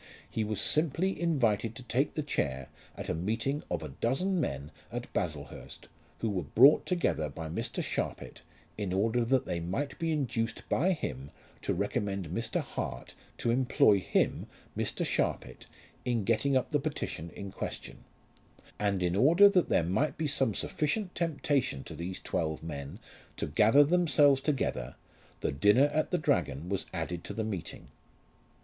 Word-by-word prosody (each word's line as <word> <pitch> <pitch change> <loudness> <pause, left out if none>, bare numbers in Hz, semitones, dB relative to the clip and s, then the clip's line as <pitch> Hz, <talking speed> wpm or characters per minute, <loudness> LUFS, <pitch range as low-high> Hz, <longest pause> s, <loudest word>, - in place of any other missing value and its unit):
He 110 - -2
was 105 -2 -2
simply 165 - +1
invited 115 - +1
to 130 - -8
take 125 +4 0
the 155 - -1
chair 70 - -2 0.3
at - - -6
a - - 0
meeting 115 - -1
of 85 -3 -2
a 75 - -5
dozen 135 - 0
men 70 - -3 0.2
at - - -6
Baslehurst - - -5 0.3
who 115 - 0
were 95 -3 -1
brought 135 - +6
together 165 - 0
by 80 +3 -6
Mr. 80 - -3
Sharpit - - -3 0.4
in 100 -3 -2
order 115 +5 +2
that 130 +2 +2
they 85 - -2
might 95 - -3
be 165 -1 0
induced 120 -6 -2
by 185 +6 +3
him 70 - -5 0.3
to - - -1
recommend 100 -4 -2
Mr. 115 +6 -1
Hart - - -5 0.2
to 115 - 0
employ 120 -5 +4
him, 90 - 0 0.3
Mr. - - -1
Sharpit, - - -2 0.4
in 120 -4 0
getting 115 +6 +2
up 130 - -2
the 145 - +2
petition 140 - -4
in 100 -1 -6
question; - - -6 0.8
and 100 -3 +1
in 90 0 +1
order 165 - +7
that 185 -3 +2
there - - +3
might 110 - 0
be 160 - -1
some 135 -7 +1
sufficient 180 +6 -1
temptation 145 - 0
to - - -8
these 85 +4 -5
twelve 80 -1 -2
men 70 -3 -6 0.4
to - - -1
gather 110 - +5
themselves 145 -4 +4
together, 130 - -1 0.5
the - - 0
dinner 105 - +4
at 155 - +1
the 180 - +1
Dragon 85 - 0
was 100 -1 -1
added 85 0 -4
to - - -6
the 110 - -1
meeting. 100 -6 -5
115 Hz, 160 wpm, -30 LUFS, 90-145 Hz, 0.8 s, order